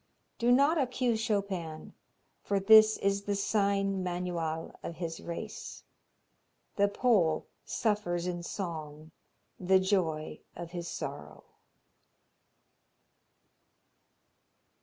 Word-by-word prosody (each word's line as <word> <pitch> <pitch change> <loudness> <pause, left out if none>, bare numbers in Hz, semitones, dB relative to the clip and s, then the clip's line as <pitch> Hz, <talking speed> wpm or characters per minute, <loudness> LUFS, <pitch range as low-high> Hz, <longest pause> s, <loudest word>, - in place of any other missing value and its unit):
Do 240 +1 +3
not 285 +6 +4
accuse 250 -3 0
Chopin, 195 -8 -3 0.5
for 200 -1 0
this 215 +2 +7
is 200 0 0
the 205 - 0
sign 195 -1 +1
manual 175 -3 -3
of 170 - -6
his 165 -1 -5
race. 170 - -7 0.9
The 200 0 +4
Pole 200 -7 +2 0.2
suffers 190 -6 -1
in 175 -1 -3
song 160 -4 -6 0.5
the 190 +1 +4
joy 165 -6 0 0.2
of 170 -1 -7
his 175 -1 -5
sorrow. - - -6
190 Hz, 95 wpm, -30 LUFS, 170-210 Hz, 0.9 s, this